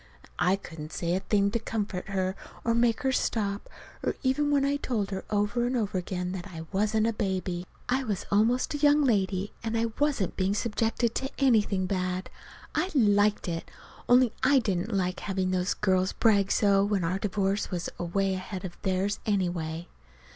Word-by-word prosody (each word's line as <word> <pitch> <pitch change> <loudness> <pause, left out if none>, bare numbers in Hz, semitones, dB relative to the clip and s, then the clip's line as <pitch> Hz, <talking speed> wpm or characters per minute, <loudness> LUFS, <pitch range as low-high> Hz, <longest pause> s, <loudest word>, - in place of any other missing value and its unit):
And 180 - +3
I 190 - +4
couldn't 160 -5 -9
say 170 0 -1
a 185 - +1
thing 200 0 +1
to 235 - 0
comfort 210 -5 -3
her, 190 -1 -1 0.3
or 230 - +2
make 235 -1 +2
her 265 - +2
stop, 205 -5 -1 0.5
even 285 +3 +2
when 280 -1 +3
I 285 +1 +1
told 220 -8 -2
her 190 - -3
over 210 +3 +1
and 250 +1 0
over 210 -4 -1
again 180 0 -3
that 185 0 -5
I 165 -4 -8
wasn't 215 +2 +1
a 230 - +1
baby. 185 -4 -2 0.2
I 260 +2 +1
was 210 -5 -3
almost 225 +7 +2
a 295 - -2
young 295 0 +5
lady; 195 -5 +1
and 230 0 -1
I 230 0 0
wasn't 285 - +1
being 190 +1 +1
subjected 230 +1 0
to 270 - -2
anything 215 -8 +3
bad. 185 0 -2 0.4
I 370 - 0
liked 205 -5 +3
it 165 -1 -4 0.4
only 245 -1 +5
I 275 +2 +5
didn't 200 -3 0
like 185 -3 0
to - - -9
have 190 -2 -1
those 185 +1 0
girls 185 -2 +1
brag 200 -3 +3
so, 200 -2 +4
when 200 -2 0
our 180 +3 0
divorce 200 0 0
was 175 -2 -3
away 190 +3 0
ahead 185 0 -5
of 175 - -9
theirs, 190 +2 0
anyway. 175 -5 -1
200 Hz, 185 wpm, -28 LUFS, 185-230 Hz, 0.5 s, young